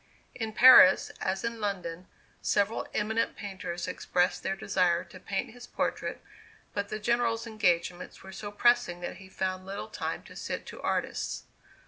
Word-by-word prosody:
In 225 -3 -4
Paris, 240 -6 +8
as 190 +2 -1
in 230 -1 -3
London, 180 -4 -3 0.3
several 205 +2 +1
eminent 220 +2 0
painters 185 -4 -5
expressed 180 0 0
their 195 - -1
desire 180 -3 +1
to 185 - -13
paint 195 +2 -3
his 245 +1 -12
portrait, - - -3 0.5
but 200 0 -2
the - - -3
General's 235 +1 +1
engagements 180 -5 -1
were 190 - -10
so 205 +1 -7
pressing 240 -5 +2
that 175 - -5
he 190 -1 -13
found 185 0 -2
little 195 +2 -6
time - - -4
to - - -14
sit - - -4
to - - -9
artists. - - -2
195 Hz, 155 wpm, -29 LUFS, 185-225 Hz, 0.5 s, Paris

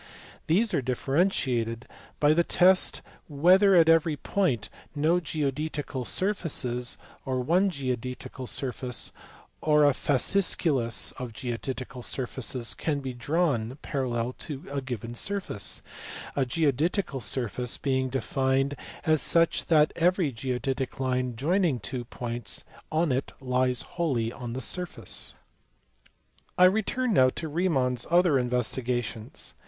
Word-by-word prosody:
These 205 +7 +2
are 150 - +2
differentiated 125 -3 0 0.3
by 150 +1 +5
the 170 +2 +3
test 185 +2 +4 0.2
whether 185 +7 +5
at 165 -2 +6
every 165 -2 +4
point 140 - 0 0.3
no 160 +4 +3
geodetical 150 -3 -3
surfaces, 140 - 0 0.3
or 130 -1 -1
one 175 +10 +3
geodetical 130 -3 -4
surface, 125 -2 -2 0.5
or 150 -1 +4
a 145 - +6
fasciculus 140 -3 +1
of 125 -3 -5
geodetical 125 +1 -5
surfaces 125 -1 -1
can 145 -3 -2
be 130 -2 -4
drawn 130 -2 0
parallel 125 -3 -2
to 140 -3 -6
a 140 -1 -2
given 120 -3 -5
surface: 185 - -2 0.5
a 135 -2 +1
geodetical 145 +2 0
surface 120 +2 -1
being 130 -1 0
defined 135 +1 0 0.3
as 155 -3 +4
such 165 +4 +2
that 155 -2 +4
every 175 -2 +2
geodetic 130 +2 -3
line 125 -2 -1
joining 160 - +1
two 120 +3 -5
points 115 -4 -5 0.3
on 160 -1 +2
it 130 +2 -1
lies 125 -1 +1
wholly 130 -10 -1
on 120 -3 -6
the 130 - -4
surface. 165 - -2 1.2
I 180 - +7
return 220 +5 +2
now 130 -6 +6
to 160 - -3
Riemann 150 -6 +1
s 120 -1 -4
other 170 -4 +4
investigations. 120 -2 -2
135 Hz, 120 wpm, -27 LUFS, 125-165 Hz, 1.2 s, I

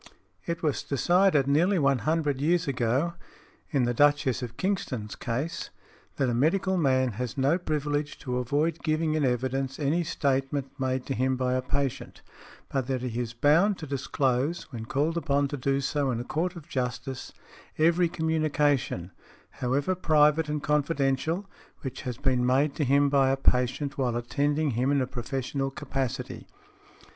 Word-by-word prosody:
It 170 -1 -3
was 150 -3 0
decided 175 +1 +3
nearly 170 +8 +3
one 140 -4 +3
hundred 150 -2 0
years 170 +2 +2
ago, 135 +5 0 0.6
in 140 -5 +1
the 120 0 +1
Duchess 145 -1 +3
of 120 -1 -6
Kingston's 130 - -2
case, 130 +8 -3 0.5
that 135 - +1
a 120 - 0
medical 180 +9 +2
man 130 -6 +2
has 125 0 -4
no 140 +6 +2
privilege 150 -3 -2
to 125 -2 -2
avoid 150 +6 0
giving 155 -1 0
in 155 -1 +1
evidence 130 +1 -1
any 155 +4 +1
statement 135 -3 -1
made 130 -1 -1
to 135 - -2
him 130 0 0
by 125 0 0
a 130 - +1
patient, 140 0 -3 0.5
but 135 -3 -1
that 130 -2 -2
he 120 -2 -3
is 120 -1 -4
bound 165 - +4
to 160 - -7
disclose, 140 +3 -1
when 115 -3 -6
called 150 +7 0
upon 145 -3 +1
to 145 - -3
do 135 0 0
so 140 0 0
in 120 -2 -1
a - - -3
court 175 +7 -2
of 165 -2 -10
justice, 125 -1 -4 0.5
every 170 +2 +3
communication, 150 - 0 0.4
however 140 +8 0
private 155 -3 +3
and 150 -1 -2
confidential, 150 +4 0 0.3
which 130 -1 -5
has 125 -3 -4
been 130 -3 +1
made 135 +4 +2
to 150 - -1
him 140 +1 +4
by 135 -1 +3
a 135 - +1
patient 135 +2 +1
while 125 -3 +1
attending 145 +5 0
him 125 +4 +1
in 140 - +3
a 130 - +1
professional 135 +2 -3
capacity. 135 -2 -4
140 Hz, 165 wpm, -27 LUFS, 130-155 Hz, 0.6 s, bound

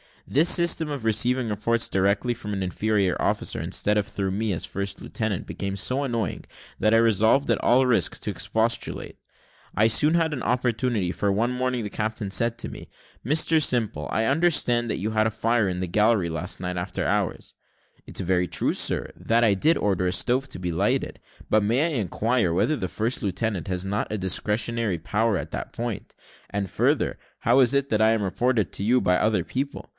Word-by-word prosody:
This 160 +5 +4
system 170 -2 +4
of 140 -5 -5
receiving 115 +3 +1
reports 110 +2 0
direct 100 +1 +1
from 105 -2 -6
an 95 -1 -2
inferior 100 0 0
officer, - - -1
instead 105 +1 -1
of 105 - 0
through 95 -1 -3
me, 105 +1 -1
as 80 - -4
first 100 0 -4
lieutenant, 110 -5 -3
became 100 0 -5
so 130 +8 0
annoying, 115 - -3 0.3
that 110 +1 +2
I - - +6
resolved, 115 +4 +3
at - - 0
all 130 +2 +4
risk 125 -2 +2
to - - -2
expostulate. 115 +1 -2 0.6
I 110 - +4
soon 150 +7 +4
had 165 -2 +1
an 130 - -4
opportunity, 120 -5 0
for 100 +2 -1
one 115 +5 0
morning 125 -1 -2
the 105 - -4
captain 105 -2 -4
said 115 +3 +1
to - - -3
me, - - -10 0.4
"Mr 155 +3 +3
Simple, 110 - 0
I 110 - 0
understand 135 -5 +2
that - - -2
you 105 +4 -2
had 110 0 +2
a - - -2
fire 110 0 +1
in 90 -1 -3
the 95 - -2
galley 105 -1 +2
last 85 +3 -3
night 90 0 -3
after 90 +1 -3
hours." - - -2 0.5
"It's - - -3
very 90 -1 0
true, 80 -1 0
sir, - - +1
that 115 +1 +1
I 110 -3 +4
did 155 - +2
order 95 -3 0
a 90 - 0
stove 130 +6 +1
to 110 - -7
be 90 -1 -3
lighted; 80 - -1 0.3
but 110 - +3
may 115 +7 +2
I 150 -7 -1
inquire 105 -1 0
whether 150 - +1
the 95 - -3
first 115 +8 -2
lieutenant 105 -3 -2
has 90 -1 -2
not 100 +2 -2
a 110 - -2
discretionary 105 +2 0
power 105 +5 0
in - - -5
that - - -6
point? 120 -3 -5 0.3
and 100 -2 -3
further, - - 0 0.2
how 120 +4 +3
is 130 0 +4
it 140 0 +1
that 110 -1 +1
I 110 0 +5
am 110 -2 0
reported 110 - 0
to - - -2
you 125 +4 +3
by 90 0 +2
other 105 -5 +1
people? 140 - -5
110 Hz, 200 wpm, -24 LUFS, 100-120 Hz, 0.6 s, I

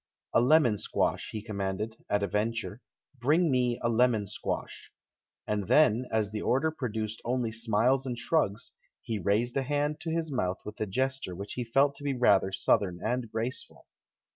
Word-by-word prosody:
"A - - +5
lemon 125 -5 +4
squash," - - -1
he 110 -2 -5
commanded, 105 +1 -3
at 105 0 +1
a - - +1
venture, 110 +3 -2 0.4
"bring 155 +6 +3
me 125 -2 +2
a - - +2
lemon 115 -2 +3
squash!" - - -5 0.5
And 105 -3 -2
then, 125 -5 +4
as 110 -2 0
the 105 -1 -4
order 150 +5 +1
produced 110 -6 -4
only 120 -1 -1
smiles 115 +4 +1
and 120 -2 -3
shrugs, 115 -4 0 0.3
he 110 -2 -3
raised 110 +7 +1
a - - +2
hand 145 +2 -1
to 160 +1 -5
his 160 -1 -1
mouth 95 -8 -1
w 105 - -6
ith - - -12
a 105 - -1
gesture 130 -3 -1
which 100 +3 -6
he 125 - -3
felt 135 +5 +3
to - - -10
be 140 -2 -1
rather 100 -6 +4
Southern 95 -2 +1
and 125 -3 -1
graceful. 115 +3 -4
115 Hz, 180 wpm, -29 LUFS, 105-130 Hz, 0.5 s, A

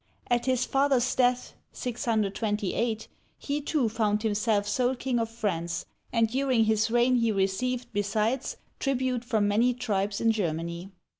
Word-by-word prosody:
At 240 +1 +2
his 255 -1 +2
father's 270 -2 +2
death 250 -1 +1 0.2
(628), 220 -1 -1 0.3
he 290 +1 -3
too 290 -4 +1
found 215 -1 0
himself 210 -1 +1
sole 250 +5 +1
king 250 -1 -1
of 225 -1 -1
France, 175 -7 -2 0.3
and 230 -1 +3
during 255 -1 +2
his 220 0 +2
reign 240 +2 +3
he 230 -2 +2
received, 225 +6 0
besides, 215 +5 -1 0.2
tribute 255 -3 0
from 220 -4 +1
many 235 +4 +2
tribes 205 -4 -1
in 225 - +3
Germany. 170 -2 -3
230 Hz, 140 wpm, -28 LUFS, 205-250 Hz, 0.3 s, and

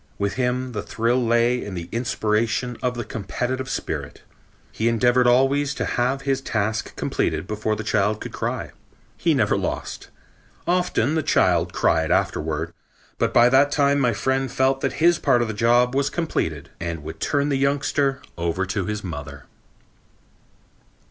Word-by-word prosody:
With 100 0 -1
him 125 0 -1
the 105 -3 -3
thrill 120 +4 0
lay 120 +1 +2
in 100 -2 -6
the 85 -1 -5
inspiration 115 +1 0
of 125 -1 -1
the 120 - -3
competitive 125 +6 -3
spirit. - - -4 0.5
He 110 - -1
endeavored 120 +2 +3
always 135 +3 +3
to - - -2
have 130 +3 0
his 135 -1 0
task 110 -3 -2
completed - - -1
before 110 +2 -2
the 110 - -5
child 105 0 +1
could - - -7
begin - - -21
to - - -8
cry. - - -3 0.4
He - - +1
never - - +2
lost. - - -4 0.6
Often 175 -6 +1
the 160 - +1
child - - +2
cried 80 -1 +1
afterward, 75 -1 0 0.5
but - - +1
by 120 0 +6
that 135 +3 +4
time 140 -1 +3
my 125 -3 +3
friend 130 +3 -1
felt 135 0 +1
that 135 - -1
his 170 +1 +3
part 125 -4 +3
of - - -3
the 110 - -3
job 120 +3 +3
was 140 +1 +1
completed 80 - -3
and 85 -2 -4
would 80 +1 -8
turn 145 0 0
the 140 - +1
youngster 140 0 0 0.2
over 85 +3 -1
to 95 0 -2
her 105 - -1
mother. 80 -6 -7
120 Hz, 170 wpm, -23 LUFS, 105-135 Hz, 0.6 s, by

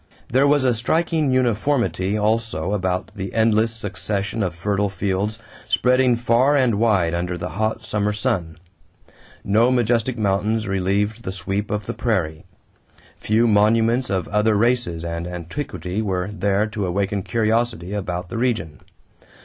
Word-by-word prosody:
There 135 +3 +4
was 145 -1 +3
a 125 -2 +3
striking 155 +5 +1
uniformity 120 -5 +1
also 105 -5 0
about 95 -2 -1
the 95 -1 -6
endless 110 0 +3
succession 105 0 -3
of 90 -4 -1
fertile 100 +3 0
fields 100 +2 -2 0.3
spreading 125 -1 +3
far 120 +4 +3
and 120 -6 +2
wide 100 -7 +2
under 90 +1 -2
the 90 +1 -4
hot 110 +2 -2
summer 105 -1 -1
sun. 90 -6 -2 0.9
No 110 +5 +3
majestic 120 0 +1
mountains 105 +1 0
relieved 100 +3 0
the 95 - -4
sweep 95 +2 -3
of 105 -1 -2
the - - -4
prairie. 90 -10 -1 0.7
Few 110 +2 +2
monuments 115 +3 +3
of 95 -3 -1
other 105 +1 +2
races 115 -8 0
and 85 0 -4
antiquity 90 - -4
were 95 -2 -2
there 100 0 +1
to 105 -3 -3
awaken 100 +2 -1
curiosity 110 -3 0
about 90 -3 -4
the 115 - -4
region. 110 -12 -1
105 Hz, 140 wpm, -22 LUFS, 95-115 Hz, 0.9 s, There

